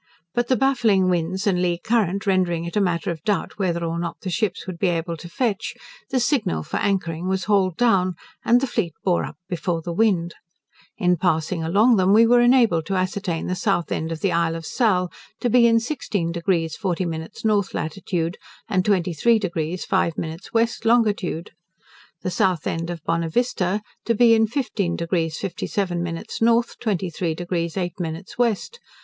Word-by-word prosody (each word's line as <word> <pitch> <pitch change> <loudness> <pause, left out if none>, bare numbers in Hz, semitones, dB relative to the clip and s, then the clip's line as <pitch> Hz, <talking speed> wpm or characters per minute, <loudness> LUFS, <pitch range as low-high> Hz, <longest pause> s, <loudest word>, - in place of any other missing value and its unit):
But 240 +2 0
the 260 - +3
baffling 235 -9 +3
winds 180 +3 -1
and 185 -3 +2
lee 175 -1 +1
current 200 -2 0
rendering 180 -4 +1
it 170 - -6
a 210 - +3
matter 175 -2 0
of 160 -2 -6
doubt 205 0 -1
whether 170 -3 0
or 165 0 -2
not 170 -1 -4
the 185 - -4
ships 210 -1 -1
would 185 -3 -7
be 195 - +2
able 170 -1 -1
to 170 +2 -10
fetch, 215 0 -2 0.3
the 260 - +1
signal 235 - 0
for - - -4
anchoring 180 -4 -1
was 190 0 0
hauled 190 -4 +2
down, 190 -7 +3 0.3
and 240 +2 +4
the - - +2
fleet 205 - -2
bore 180 -2 +2
up - - -9
before 175 -2 -2
the 170 - -4
wind. 175 -4 +2 0.6
In 180 -3 +2
passing 160 0 0
along 210 +8 +4
them 190 +1 +4
we 225 +2 +7
were 240 +1 +5
enabled 235 -10 +4
to 195 - -1
ascertain 185 -2 -1
the 180 - -1
south 185 -4 0
end 160 +1 -2
of 160 - -5
the 195 - +1
Isle 165 -1 +1
of 165 -1 -6
Sal 185 -7 +1 0.3
to 240 - 0
be 240 0 +6
in 230 0 +4
16 215 - -2
deg 170 -1 0
40 185 0 -2
min 160 -1 -4
north 205 -3 +1
latitude, 170 0 -2 0.3
and 185 -2 +1
23 190 +3 +2
deg 175 -3 -2
5 165 - 0
min 160 0 -4
west 230 0 +1
longitude. 215 -7 +1 0.7
The 185 - -1
south 180 -3 +1
end 165 +1 -2
of 170 -2 -6
Bonavista 180 +4 0 0.2
to 230 - +2
be 230 +1 +6
in 220 0 +4
15 210 -8 -1
deg 165 -1 -1
57 180 -1 -2
min 170 0 -4 0.2
north, 235 +1 +2
23 180 -6 -2
deg 175 +2 -5
8 175 +1 -1
min 165 +1 -3 0.2
west. 240 - 0
185 Hz, 185 wpm, -23 LUFS, 170-215 Hz, 0.7 s, we